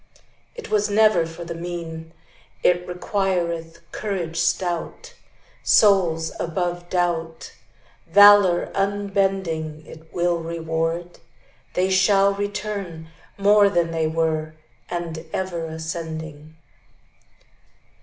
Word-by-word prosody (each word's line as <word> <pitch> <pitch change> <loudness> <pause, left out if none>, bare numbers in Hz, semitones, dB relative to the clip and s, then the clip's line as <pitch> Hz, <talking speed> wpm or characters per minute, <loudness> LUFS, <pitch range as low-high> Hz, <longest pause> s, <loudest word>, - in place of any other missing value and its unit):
It 475 -2 -9
was 210 -1 +2
never 210 -5 +4
for 165 +1 -9
the 170 - -5
mean; 165 -1 -6 0.5
It 180 0 +2
requireth 175 -3 -2
courage 180 -6 -4
stout. 180 - -2 0.5
Souls 175 -6 +3
above 175 0 -3
doubt, 170 -2 -2 0.5
Valor 205 -1 +6
unbending, 195 -6 -1
It 160 +1 -14
will 175 -1 0
reward, 165 +1 -3 0.6
They 185 +1 +1
shall 195 +1 +4
return 200 -5 -5 0.3
More 205 0 +5
than 170 -3 0
they 160 -1 0
were, 155 -1 -1 0.3
And 165 -2 -4
ever 175 -3 -3
ascending. 160 -1 -6
175 Hz, 95 wpm, -22 LUFS, 165-195 Hz, 0.6 s, Valor